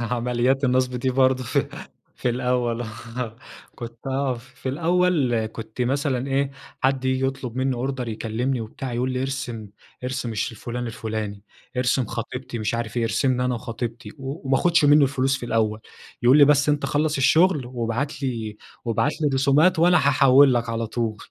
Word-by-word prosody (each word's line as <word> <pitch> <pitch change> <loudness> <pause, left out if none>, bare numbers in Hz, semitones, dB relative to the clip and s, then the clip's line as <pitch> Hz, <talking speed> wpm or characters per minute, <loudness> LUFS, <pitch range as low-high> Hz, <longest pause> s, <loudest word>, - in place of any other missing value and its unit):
عمليات 125 +3 0
النصب 130 0 +2
دي 130 +2 0
برضه 130 0 +3
في - - 0 0.5
في - - -1
الأول، 125 -1 0
آه 115 +1 -6 0.4
كنت 115 -1 -9
آه، 135 -1 0
في 125 +2 -9
الأول 160 -6 +1
كنت 110 +2 -8
مثلًا 135 0 0
إيه، 135 0 +1 0.3
حد 130 0 +1
ييجي 130 0 +1
يطلب 130 -3 -5
مني 130 0 +1
أوردر 125 0 -3
يكلمني 115 +3 -2
وبتاع 120 +3 -6
يقول 125 +2 -1
لي 125 - -2
ارسم، 120 -5 -4 0.4
ارسم 125 -2 -3
الش 110 +2 -2
فلان 120 +2 -5
الفلاني، 110 -3 -4 0.3
ارسم 125 +1 +2
خطيبتي 120 +2 -5
مش 110 +1 -1
عارف 115 -1 -4
إيه، 120 - +1
ارسمنا 125 +3 +1
أنا 125 0 0
وخطيبتي 120 +1 -5
وما 135 0 -3
اخدش 170 -1 +3
منه 145 +1 +6
الفلوس 135 0 +1
في 120 - -6
الأول، 110 -2 0 0.4
يقول 125 +4 +6
لي 145 - +9
بس 145 0 +3
أنتَ 145 -1 +1
خلص 150 +2 0
الشغل 150 +1 +3
وابعتلي 120 -2 -3 0.3
وابعتلي 145 +6 0
الرسومات 140 +6 +3
وأنا 175 +2 +5
هاحول 140 -2 +5
لك 120 -1 0
على 115 0 -2
طول 115 -1 -2
125 Hz, 160 wpm, -23 LUFS, 115-135 Hz, 0.5 s, لي